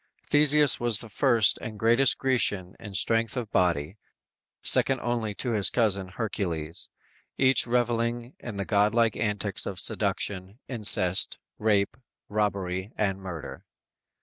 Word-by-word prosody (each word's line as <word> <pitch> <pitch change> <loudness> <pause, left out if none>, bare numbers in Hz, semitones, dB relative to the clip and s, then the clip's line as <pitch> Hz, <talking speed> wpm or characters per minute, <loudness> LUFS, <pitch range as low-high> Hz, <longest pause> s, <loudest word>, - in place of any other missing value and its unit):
Theseus 150 -1 +4
was 120 -3 +2
the 115 - -8
first 115 -3 +3
and 110 -1 -7
greatest 120 +5 +3
Grecian 100 -8 0
in 105 -3 -9
strength 115 +3 0
of 115 -4 -4
body, 90 0 0 0.7
second 135 -1 +4
only 115 -4 -2
to 125 - -2
his 105 -4 +3
cousin 100 -5 0
Hercules, 90 -6 -4 0.5
each 130 -2 +3
reveling 120 0 -1
in 120 -4 -7
the 100 - -3
god 105 +1 +2
like 115 -2 +2
antics 105 -2 -1
of 95 -3 -5
seduction, 95 +1 0
incest, 105 -6 +1 0.2
rape, 105 0 +1 0.3
robbery 100 -2 -2
and 95 -2 0
murder! 90 -5 -8
105 Hz, 130 wpm, -26 LUFS, 95-120 Hz, 0.7 s, Theseus